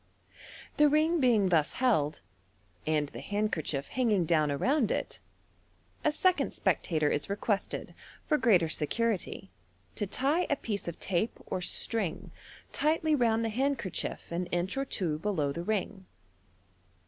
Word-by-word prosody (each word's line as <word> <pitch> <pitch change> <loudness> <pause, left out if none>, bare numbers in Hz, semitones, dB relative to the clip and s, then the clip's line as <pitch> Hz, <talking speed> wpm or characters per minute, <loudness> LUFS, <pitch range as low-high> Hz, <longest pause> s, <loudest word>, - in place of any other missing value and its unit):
The 295 0 +6
ring 315 +3 +3
being 230 -8 +3
thus 160 -4 +2
held, 185 - +1 0.7
and 150 -2 +1
the - - -9
handkerchief 165 -9 -2
hanging 220 -8 +1
down 155 -2 +2
around 240 - +1
it, - - -3 0.8
a 305 - +3
second 365 +4 +2
spectator 155 -3 +1
is 145 - 0
requested, 200 0 -2 0.3
for 300 - +2
greater 185 -9 +4
security, 195 +4 -1 0.4
to 205 - -3
tie 285 - 0
a 285 - +3
piece 210 -8 -4
of 170 - -5
tape 190 +4 -1
or 185 - -3
string 195 0 0 0.4
tightly 310 +1 +1
round 230 -4 +2
the - - 0
handkerchief 255 -7 -2
an 175 +1 -2
inch 175 +4 -1
or 275 0 -1
two 165 - -2
below 160 -7 0
the 170 - -4
ring. 190 0 -3
205 Hz, 135 wpm, -30 LUFS, 170-255 Hz, 0.8 s, The